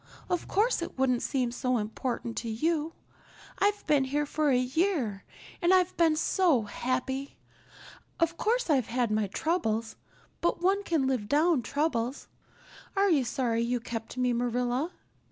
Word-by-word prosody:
Of 355 - -1
course 435 0 +2
it 335 - -6
wouldn't 255 -2 +2
seem 255 -4 0
so 250 0 0
important 230 +2 -3
to 230 - -3
you. 315 +7 0 0.7
I've 410 +1 +1
been 285 -3 +3
here 290 +3 0
for 300 +1 0
a 255 - +4
year 255 - 0 0.4
and 345 +1 +3
I've 370 -1 +3
been 325 -2 +3
so 320 - +2
happy. 255 +5 -3 0.8
Of 335 -1 +2
course, 480 +7 0
I've 270 -8 +2
had 240 -2 0
my 215 -1 +1
troubles, 225 - -1 0.4
but 345 - +1
one 385 +3 +2
can 325 -8 +1
live 255 -6 -1
down 305 -1 +3
troubles. 265 -2 -1 0.7
Are 395 0 +3
you 290 -5 +4
sorry 235 -1 0
you 240 +1 0
kept 230 +1 -6
me, 250 -1 +2
Marilla?" 245 +5 0
265 Hz, 155 wpm, -29 LUFS, 240-335 Hz, 0.8 s, a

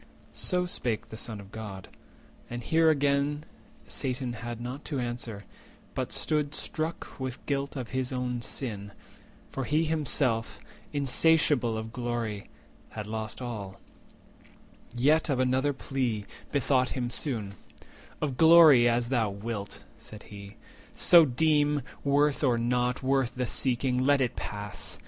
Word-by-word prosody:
So 180 -1 0
spake 120 -10 -2
the - - -8
Son 110 -1 -3
of 100 0 -12
God; 105 -4 -7 0.6
and 120 0 -5
here 160 +3 +4
again 145 0 +1 0.4
Satan 130 -2 -2
had 120 0 -6
not 125 +4 -6
to 145 -4 -2
answer, 120 -4 -4 0.5
but - - -3
stood 150 -1 0
struck 160 -1 -4
With 130 -1 -5
guilt 140 0 -2
of 125 -4 -5
his 130 -1 -2
own 125 -1 -2
sin—for 110 +3 -7
he 155 +4 +2
himself, 140 -7 0 0.3
Insatiable 145 -4 +3
of 110 +1 -6
glory, 120 -4 -3 0.4
had 105 -1 -6
lost 110 +2 -5
all; 100 -5 -6 1.2
Yet 150 +6 +3
of 135 -3 +1
another 130 +2 +2
plea 125 -6 -2 0.3
bethought 130 -2 +2
him 120 -1 -2
soon:— 115 -8 -2 0.7
"Of 135 -4 -2
glory, 160 -7 +8
as 120 0 0
thou 120 -5 +1
wilt," 100 +1 -5 0.2
said 105 -1 -11
he, 100 0 -11 0.4
"so 170 -2 +7
deem; 150 +1 +2 0.2
150 140 - -3
Worth 145 +1 +3
or 125 -4 +3
not 125 +2 0
worth 135 -2 +1
the 125 0 -1
seeking, 125 +1 0
let 140 +1 +4
it 125 -3 0
pass. 100 -3 -5
125 Hz, 135 wpm, -28 LUFS, 115-145 Hz, 1.2 s, glory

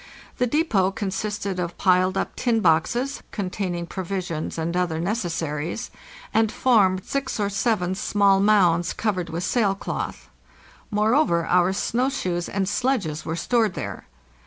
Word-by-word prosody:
The 250 - +2
depot 230 - +2
con 195 0 -3
sisted 200 -1 -3
of 175 -1 -3
piled 185 0 +3
up - - -2
tin 235 -3 +1
boxes, 230 - +1
containing 185 -3 -3
provisions 180 -3 -4
and 165 +1 -2
other 175 -3 0
necessaries, 170 -1 -2 0.4
and 220 -1 +3
formed 195 -8 +3
six 275 -4 -2
or 200 -1 +1
seven 200 -3 0
small 200 0 +3
mounds 180 -5 +3
covered 185 -6 -1
with 170 +2 -3
sail 205 -2 +1
cloth. - - -5 0.6
Moreover, 210 - +2
our 180 +1 +3
snow 245 +6 0
shoes 180 -10 -2
and 195 -1 -1
sledges 200 - -1
were 160 - -2
stored 220 +1 +1
there. - - -6
195 Hz, 140 wpm, -24 LUFS, 175-220 Hz, 0.6 s, piled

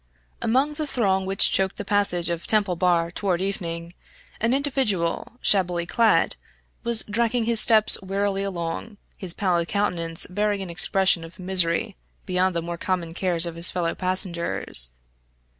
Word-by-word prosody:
Among 265 +6 +1
the 305 0 -4
throng 190 -7 0
which 195 0 +2
choked 190 0 0
the 205 - -6
passage 180 -4 +1
of 170 0 -4
Temple 205 -4 +2
Bar 170 -1 +1
toward 180 -1 -1
evening, 170 -3 -4 0.5
an 230 - +1
individual, 260 -13 0
shabbily 180 -3 +2
clad, 225 +5 +2 0.5
was 235 -2 +2
dragging 230 +2 0
his 230 -1 +1
steps 215 -2 +4
wearily 195 +1 -1
along, 195 +3 -4 0.2
his 180 -3 -4
pallid 175 -3 0
countenance 170 -5 +1
bearing 205 +1 -1
an 180 - -7
expression 175 +1 +2
of 165 +1 -12
misery 185 +1 +1 0.3
beyond 185 0 0
the 170 - -1
more 170 0 -6
common 175 -3 -2
cares 175 -1 +1
of 170 - -5
his 170 +1 +4
fellow 170 -2 -1
passengers. 170 - -2
185 Hz, 150 wpm, -24 LUFS, 170-205 Hz, 0.5 s, steps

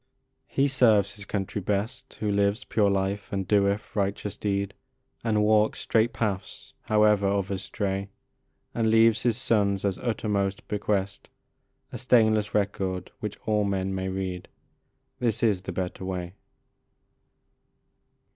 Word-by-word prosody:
He 135 +1 +2
serves 110 -7 +3
his 105 -1 -7
country 100 0 -3
best 110 +7 -3
Who 105 -1 -2
lives 100 +2 +1
pure 105 -2 +2
life, 100 +1 -1
and 95 -2 -2
doeth 100 0 +1
righteous 100 0 -1
deed, 100 -1 -2 0.5
And 105 -2 +2
walks 105 0 +3
straight 115 +1 +2
paths, 100 -4 -4
however 105 -2 +4
others 100 -1 -1
stray, 100 0 -3 0.6
And 115 -1 +1
leaves 115 0 +5
his 115 -2 +2
sons 105 -6 +2
as 95 -2 -1
uttermost 100 -4 -1
bequest 100 -1 -2 0.6
A - - -5
stainless 110 -5 +3
record 95 -3 -1
which 105 -3 -5
all 105 -1 +2
men 95 -1 -1
may 95 0 -2
read: 95 -2 -4 0.7
This 120 -3 0
is 105 -5 +2
the 95 - -5
better 90 +1 -4
way. 90 -2 -4
100 Hz, 130 wpm, -26 LUFS, 95-110 Hz, 0.7 s, leaves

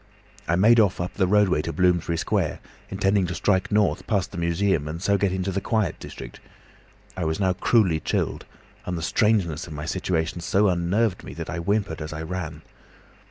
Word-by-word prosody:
I 85 - +2
made 115 +6 +5
off 100 -4 +3
up 90 +1 -3
the 95 -2 +1
roadway 100 -5 +3
to 85 - -4
Bloomsbury 85 0 +1
Square, - - -1 0.3
intending 95 -1 +1
to 85 - -4
strike 95 +1 +1
north 105 -1 +1
past 100 -3 0
the - - -8
Museum 85 -2 +1
and 80 +2 -5
so 100 +3 +2
get 100 -1 +1
into 95 +1 -2
the 95 +1 -2
quiet 110 0 -1
district. - - -9 0.8
I 95 - -3
was 80 +2 -1
now 95 -2 +2
cruelly 95 -3 +2
chilled, - - -2 0.4
and 90 -1 -2
the 80 - -4
strangeness 95 -6 +1
of 80 - -8
my 75 +1 -5
situation 85 -1 -2
so 100 +4 +2
unnerved 90 +4 0
me - - -9
that - - -6
I 90 - -4
whimpered 100 -2 -1
as 75 0 -5
I 80 +2 -5
ran. 80 -3 -5
90 Hz, 195 wpm, -24 LUFS, 85-100 Hz, 0.8 s, made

